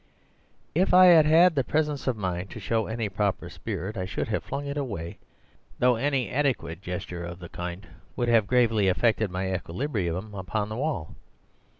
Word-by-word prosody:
"If 180 +3 +3
I 185 0 +9
had 165 -4 +7
had 165 +3 +6
the 135 -3 +1
presence 150 -1 -1
of 125 -3 +1
mind 90 -2 -3
to - - -8
show 110 +2 -1
any 110 -1 -2
proper 100 -3 -2
spirit 100 0 -5
I 95 - -2
should 100 - -3
have 110 - -1
flung 145 - -4
it 140 0 -4
away, 100 - -4 0.6
though 125 0 +4
any 135 +1 0
adequate 125 - -1
gesture 90 -1 -5
of 85 0 -6
the 90 -2 -10
kind 90 +2 -6 0.3
would 120 - -1
have 115 -4 +4
gravely 115 -5 +3
affected 110 +2 +2
my 95 +1 -2
equilibrium 95 - -3
upon 100 +2 -3
the 110 - -5
wall. 135 - -2
110 Hz, 180 wpm, -26 LUFS, 95-135 Hz, 0.6 s, I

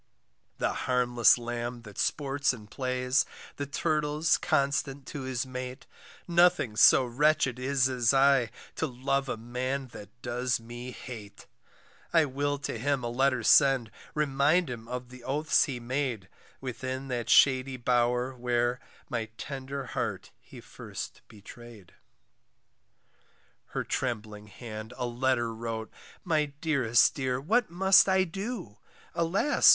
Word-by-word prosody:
The - - 0 0.2
harmless 120 -2 +4
lamb 120 0 -5
that 105 -3 -10
sports 140 -1 0
and 105 -3 -12
plays, 130 0 +1 0.3
The 140 - -3
turtle's 150 +2 +1
constant 140 -3 0
to 145 - -6
his 130 -1 -2
mate, 130 0 -7 0.4
Nothing 175 -10 +3
so 125 +4 +7
wretched 135 0 +2
is 130 0 +2
as 125 -3 +2
I, 135 -3 +4 0.3
To - - 0
love 135 +2 -1
a - - -2
man 130 +3 -3
that 105 -4 -11
does 125 +1 -1
me 120 +2 -8
hate. 115 -5 -10 0.7
I 165 -2 +5
will 145 +1 -1
to 135 -4 -5
him 140 +1 0
a 120 - -2
letter 130 0 +1
send, 130 -3 +5 0.2
Remind 150 +2 +2
him 115 -2 -7
of 125 0 -5
the 125 -1 -13
oaths 140 0 +2
he 130 -4 -5
made 120 -5 -2 0.3
Within 130 +1 -5
that 120 -2 -3
shady 130 -1 +5
bower, 125 +1 +1
where 120 0 0 0.3
My 115 -2 -3
tender 135 0 -5
heart 115 - -4
he - - -13
first - - -8
betray'd. 110 -2 -13 1.7
Her - - -3
trembling 105 -4 -3
hand 110 +1 -8
a 125 - -2
letter 120 -1 0
wrote, 110 -1 -5 0.3
My 155 -4 +2
dearest 130 -8 +3
dear, 130 -2 -1
what 215 - +1
must 190 +3 +5
I 190 0 +4
do? 190 - -6 0.3
Alas! 170 - +3
130 Hz, 135 wpm, -29 LUFS, 120-140 Hz, 1.7 s, so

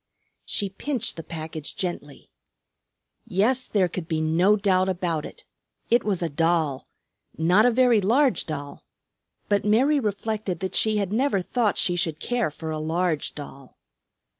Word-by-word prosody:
She 200 - -1
pinched 235 +4 -3
the 165 - -6
package 160 -1 -7
gently. 175 -6 -5 1.0
Yes, 230 +6 +1
there 195 -4 +2
could 175 -1 -6
be 160 -2 -1
no 170 +6 +3
doubt 190 -2 +2
about 170 -4 -2
it. - - -14 0.5
It 240 - +4
was 195 -4 -1
a - - +1
doll, 160 -2 0 0.5
not 180 +8 +4
a - - +4
very 240 -2 +4
large 245 - +2
doll; 145 -2 -6 0.6
but 205 -1 +1
Mary 255 +8 +3
reflected 210 -3 -2
that 190 - -3
she 220 -1 +2
had 200 -1 -1
never 250 -3 +2
thought 225 0 0
she 175 - +1
should 165 -3 -1
care 245 -3 0
for 160 +1 -6
a 155 - -3
large 160 0 -1
doll. 140 -3 -10
185 Hz, 155 wpm, -25 LUFS, 160-215 Hz, 1.0 s, It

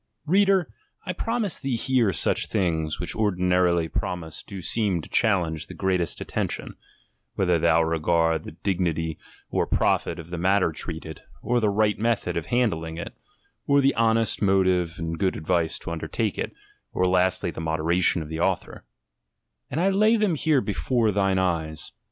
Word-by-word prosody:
Reader, 190 +1 +3 0.3
I 180 - -2
promise 225 -1 -2
thee 135 -3 -1
here 125 -3 +2
such 85 - 0
things, 80 -6 -1
which 90 - -3
ordinarily 90 -4 +2
promised 80 -2 -4
do 100 - -7
seem 105 -5 +1
to - - -11
challenge 85 -8 +1
the - - -10
greatest 90 -3 -1
attention, - - -4 0.6
(whether 90 -3 +2
thou 85 0 +4
regard 80 0 +1
the - - -9
dig 90 +3 -2
nity 80 -3 -1 0.3
or - - 0
profit 85 - +1
of 85 0 -10
the 85 - -4
matter 95 -1 +2
treated, 80 0 -7 0.2
or 120 0 +1
the 110 -3 +2
right 105 +1 +1
method 115 0 0
of - - -3
handling 85 -10 0
it, - - -6 0.5
or 140 0 +5
the 135 0 +3
honest 115 -1 +1
motive 95 -4 +2
and 80 0 -4
good 95 -2 0
advice 80 +1 0
to - - -7
undertake 85 -1 -2
it, - - -2 0.4
or 90 - +1
lastly 90 -1 +2
the 80 - -7
modera 80 +2 0
tion 85 -2 +3
of - - -9
the 80 +1 -5
author,) 95 +1 -1 0.9
and 155 - -2
I 185 +3 +3
lay 215 +4 +4
them 210 -5 +2
here 155 -2 +2
before 115 +1 0
thine 95 -1 +1
eyes. 80 -4 -1
90 Hz, 170 wpm, -25 LUFS, 80-115 Hz, 0.9 s, or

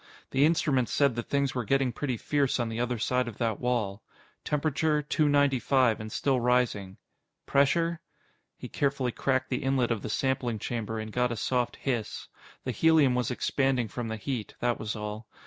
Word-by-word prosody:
The 135 +2 +4
instruments 150 -6 +2
said 140 -3 +3
that 120 - -5
things 140 -1 +1
were 125 - -2
getting 135 +2 +1
pretty 130 -1 -2
fierce 140 +1 0
on 120 -1 0
the 115 +1 -4
other 120 0 -1
side 125 +3 0
of 115 - -7
that 115 -3 -1
wall. 110 -5 -1 0.4
Temperature: 150 +1 0
Two 150 +1 +1
ninety 145 -2 +3
five 125 -2 +2
and 110 0 -7
still 135 +1 +1
rising. 120 -6 +1 0.5
Pressure? 165 +4 +2 0.6
He - - -7
carefully 140 -3 0
cracked 130 +1 -1
the 125 - 0
inlet 130 -3 +1
of 115 -3 -1
the - - -5
sampling 125 -1 0
chamber 110 0 -3
and 110 0 -5
got 125 0 +1
a 120 - -3
soft 125 +3 0
hiss. 120 -6 -3 0.3
The 130 - -2
helium 155 -1 +4
was 125 -1 0
expanding 130 -1 0
from 120 +1 -4
the 110 0 -3
heat, 120 -1 -4
that 120 -1 0
was 110 +1 -3
all. 105 +1 -6
125 Hz, 185 wpm, -28 LUFS, 115-140 Hz, 0.6 s, The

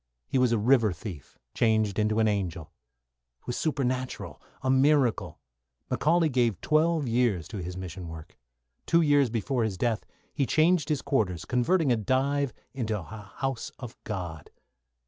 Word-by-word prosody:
He 130 - +1
was 125 -2 +3
a 115 - +3
river 115 -1 +4
thief 85 - -9 0.2
changed 110 -3 +2
into 105 0 +1
an 110 -1 +3
angel. 90 -6 -2 0.7
It - - -33
was 120 - -3
supernatural, 130 -4 -2 0.2
a 130 - 0
miracle. 130 - +2 0.5
McCauley 165 0 +2
gave 120 -7 +1
twelve 155 -1 +2
years 115 -8 +1
to 110 - -6
his 90 0 -5
mission 90 -1 -7
work. 80 -1 -10 0.5
Two 170 0 +4
years 145 -4 +4
before 115 +2 -1
his 105 -4 -2
death 115 +1 0 0.3
he 140 - 0
changed 160 -1 +3
his 150 -3 0
quarters, 95 - 0
converting 140 +4 +2
a 120 - +3
dive 135 +5 +1 0.2
into 110 -5 -2
a - - -8
House 110 - -5
of 120 -3 -8
God. 90 -7 -5
120 Hz, 155 wpm, -28 LUFS, 100-135 Hz, 0.7 s, river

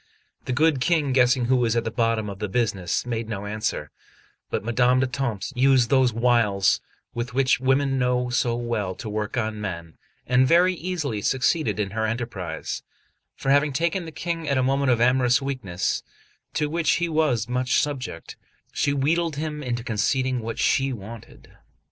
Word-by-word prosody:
The - - -3
good 145 0 +2
King, 150 -2 +2
guessing 125 -1 +3
who 130 +2 +3
was 120 -2 +1
at 115 - +1
the 115 - -3
bottom 115 -2 0
of 100 -1 -7
the 105 -1 -3
business, 100 -5 -1
made 115 -2 -3
no 105 -2 -4
answer; 105 -8 -3 0.6
but - - -2
Madame 125 +3 +3
d'Etampes 130 -4 -2
used 130 -2 +3
those 130 -2 +4
wiles 115 -5 +2 0.3
with 120 +2 -4
which 130 -2 +3
women 135 +1 +1
know 125 0 0
so 120 -2 +1
well 115 -6 -2
to 105 - -8
work 105 +2 -3
on 110 -2 -2
men, 85 -5 -6 0.3
and 125 +1 +3
very 175 +4 +5
easily 160 - -3
succeeded 130 - +1
in 100 -2 -1
her 110 +1 -1
enterprise; 115 -6 -4 0.5
for 135 - -1
having 145 +1 +4
taken 170 +5 0
the 160 - -8
King 165 0 -4
at 140 - +2
a 130 - +2
moment 135 +1 +1
of 120 -2 +3
amorous 125 0 +3
weakness, 125 -11 -2 0.5
to 150 - +1
which 165 +2 +1
he 175 - 0
was 155 -9 +1
much 125 0 +1
subject, 140 -4 -4 0.4
she 140 - +1
wheedled 160 +3 +1
him 150 0 -4
into 120 -3 -3
conceding 130 +3 0
what 115 0 -5
she 135 0 +2
wanted. 115 -1 -10
125 Hz, 170 wpm, -24 LUFS, 110-140 Hz, 0.6 s, very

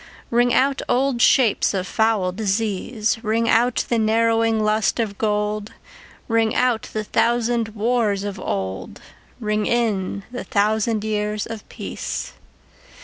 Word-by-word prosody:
Ring 240 +1 +3
out 270 +3 +2
old 260 -1 +1
shapes 235 -6 +4
of 185 -1 -1
foul 215 -1 +1
disease, 215 +2 -1
Ring 230 +1 +1
out 235 +2 +2
the 235 - +1
narrowing 225 0 +2
lust 215 +2 +1
of 210 -3 -2
gold; 210 0 -1 0.5
Ring 225 -1 +1
out 250 -1 +1
the 215 - -2
thousand 230 0 0
wars 215 -3 +1
of 205 -1 -5
old, 95 - -4 0.4
Ring 210 -2 -1
in 205 -5 0
the 245 - -5
thousand 215 +1 +1
years 210 -1 -1
of 225 -2 -8
peace. - - -5
220 Hz, 130 wpm, -22 LUFS, 210-230 Hz, 0.5 s, shapes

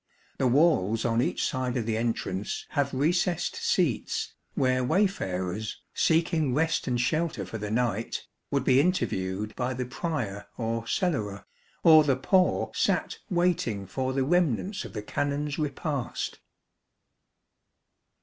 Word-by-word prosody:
The 130 - +3
walls 120 - +3
on 115 0 +2
each - - 0
side 130 -1 -1
of 115 - -1
the 110 -1 0
entrance 110 -4 -2
have 140 -2 0
recessed 170 +5 +1
seats, - - 0 0.2
where 130 -1 +2
wayfarers, 110 - -1
seeking 160 -5 +2
rest 160 +2 +1
and 125 -1 0
shelter 155 - 0
for 110 +5 -6
the 105 0 -4
night, 115 -1 -1 0.2
would 140 -2 0
be 130 0 +5
interviewed 105 - -1
by 125 0 -2
the 125 0 -2
Prior 120 - -3
or 115 -1 -2
Cellarer, 110 - -1 0.4
or 155 -2 +8
the 140 -3 +2
poor 180 +8 +2
sat - - 0
waiting 175 - +1
for 130 +7 -2
the 135 0 +1
remnants 175 - +1
of - - -9
the 105 -2 -4
Canons' 145 +5 -2
repast. 145 -3 -3
130 Hz, 130 wpm, -28 LUFS, 110-155 Hz, 0.4 s, or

